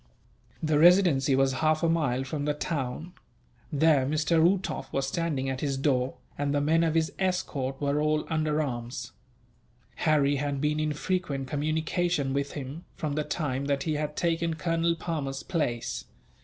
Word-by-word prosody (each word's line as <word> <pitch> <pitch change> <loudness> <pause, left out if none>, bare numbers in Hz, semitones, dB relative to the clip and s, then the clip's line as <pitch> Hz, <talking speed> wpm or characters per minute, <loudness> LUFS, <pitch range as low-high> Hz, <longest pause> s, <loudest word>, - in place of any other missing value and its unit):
The 155 -1 +2
Residency 165 -6 +5
was 135 0 +3
half 155 +1 +2
a - - +4
mile 140 -6 +1
from 145 +2 -3
the 150 0 0
town. 150 +3 -3 0.6
There 150 -2 +4
Mr. 155 +4 +2
Uhtoff 185 +3 +1
was 135 0 0
standing 145 -3 -1
at 130 -1 -3
his 140 -2 -1
door, 135 -2 +1 0.2
and 145 0 0
the - - +3
men 160 +3 +3
of 165 -1 +1
his 160 -1 +2
escort 155 -8 -1
were 145 +1 +1
all 155 0 +1
under 155 -1 +1
arms. 120 -2 -5 0.9
Harry 145 -3 +3
had 140 0 -2
been 150 +1 0
in 155 -1 0
frequent 150 -5 -2
communication 155 0 0
with 140 0 -1
him, 145 +4 -6
from 150 -2 -3
the 150 +1 0
time 140 -4 -2
that 140 -1 0
he 155 - -1
had 150 0 -2
taken 165 -1 0
Colonel 165 0 +1
Palmer's 145 -5 -3
place. 125 -10 -2
150 Hz, 165 wpm, -28 LUFS, 135-165 Hz, 0.9 s, Residency